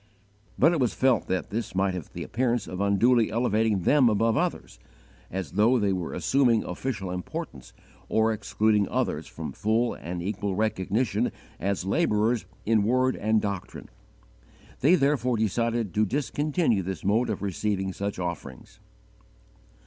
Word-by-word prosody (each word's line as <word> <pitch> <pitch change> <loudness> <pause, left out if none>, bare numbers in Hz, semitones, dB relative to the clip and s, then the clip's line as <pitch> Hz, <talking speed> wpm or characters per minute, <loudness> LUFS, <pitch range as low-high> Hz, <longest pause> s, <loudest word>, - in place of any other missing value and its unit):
But 160 - +5
it 170 - 0
was 125 -4 +1
felt 130 -4 +2
that 95 +1 -2
this 110 -2 -4
might 95 0 +1
have 90 -5 -6
the - - -6
appearance 120 0 0
of 95 +1 -5
unduly 110 +4 +3
elevating 110 -3 +1
them 135 - +5
above 110 +1 +2
others, - - -2 0.5
as 95 -5 -4
though 110 +7 +3
they 100 -4 +1
were 90 -3 -4
assuming 125 -5 +2
official 95 -1 -4
importance, 90 0 -6 0.4
or 110 0 +2
excluding 105 -1 +1
others - - -1
from - - -6
full 115 +3 0
and 85 +2 -6
equal 100 0 -2
recognition 110 +3 0 0.3
as 95 -1 -1
labourers 105 +4 +1 0.2
in 110 -1 +3
word 130 +4 +2
and 110 +1 +1
doctrine. 100 -3 -5 0.9
They 155 +8 +5
therefore 135 -5 +1
decided 115 -1 0
to 105 0 +2
discontinue 145 - 0
this 95 -2 -5
mode 110 +5 +2
of 105 -2 -3
receiving 95 0 -2
such 100 +1 -4
offerings. 85 -7 -6
110 Hz, 145 wpm, -26 LUFS, 95-120 Hz, 0.9 s, But